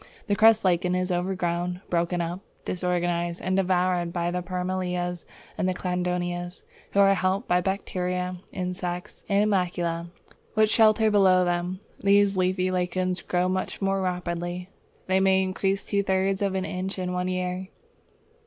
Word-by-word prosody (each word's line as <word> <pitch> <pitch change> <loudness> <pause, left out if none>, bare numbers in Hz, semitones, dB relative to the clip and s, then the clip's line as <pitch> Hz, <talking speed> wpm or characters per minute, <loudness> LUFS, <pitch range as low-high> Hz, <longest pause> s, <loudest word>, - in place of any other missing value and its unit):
The 205 - +1
crust 220 0 +5
lichen 180 0 +2
is 185 0 -1
overgrown, 180 0 -1
broken 175 0 +1
up, 170 +2 -3 0.3
disorganized, 175 -1 -1
and 185 0 -1
devoured 180 -2 +1
by 175 0 -1
the 180 0 -2
Parmelias 180 -1 -2 0.3
and - - +1
Cladonias, 180 -1 -2 0.3
who 200 - +2
are 195 0 +6
helped 190 +4 0
by 180 0 +3
bacteria, 180 -1 -2
insects, 180 -1 -4
and 200 0 +3
animalcula 175 -3 -1 0.5
which 215 0 +4
shelter 220 -1 +5
below 185 -3 +5
them. 175 +2 -1 0.2
These 200 0 +4
leafy 185 0 +1
lichens 185 0 -1
grow 180 0 0
much 185 0 -2
more 195 0 0
rapidly. 180 0 -3 0.4
They 190 0 +2
may 190 0 +4
increase 195 +1 -1
two 200 -1 +1
thirds 190 0 0
of 195 -1 0
an 190 -1 -1
inch 185 +2 -4
in 180 -1 -2
one 180 0 -1
year. 185 0 -2
180 Hz, 145 wpm, -26 LUFS, 180-190 Hz, 0.5 s, are